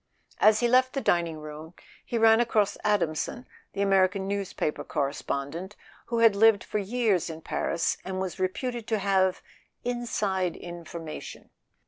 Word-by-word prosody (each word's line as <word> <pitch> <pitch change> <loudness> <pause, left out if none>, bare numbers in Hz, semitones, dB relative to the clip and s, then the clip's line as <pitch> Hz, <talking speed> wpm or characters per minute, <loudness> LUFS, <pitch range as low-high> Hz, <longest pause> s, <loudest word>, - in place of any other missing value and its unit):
As 215 +1 +5
he 240 - +3
left 255 +1 +4
the 275 - -1
dining 170 -8 +1
room 155 +2 -9 0.3
he 235 - -3
ran 225 0 +6
across 220 -4 +2
Adamson, 210 +3 0 0.3
the 200 - 0
American 195 0 +2
newspaper 195 -6 -2
correspondent, 145 +5 -3 0.3
who 235 - -1
had 230 -3 +5
lived 220 0 +5
for 210 - -2
years 205 -4 0
in 160 0 -7
Paris 165 +1 -1
and 185 0 -4
was 190 0 -4
reputed 230 +5 -2
to 220 - +1
have 190 -2 +1 0.4
"inside 210 -7 -1
in¬ 170 -2 -9
formation." 160 -3 -8
195 Hz, 145 wpm, -27 LUFS, 170-225 Hz, 0.4 s, ran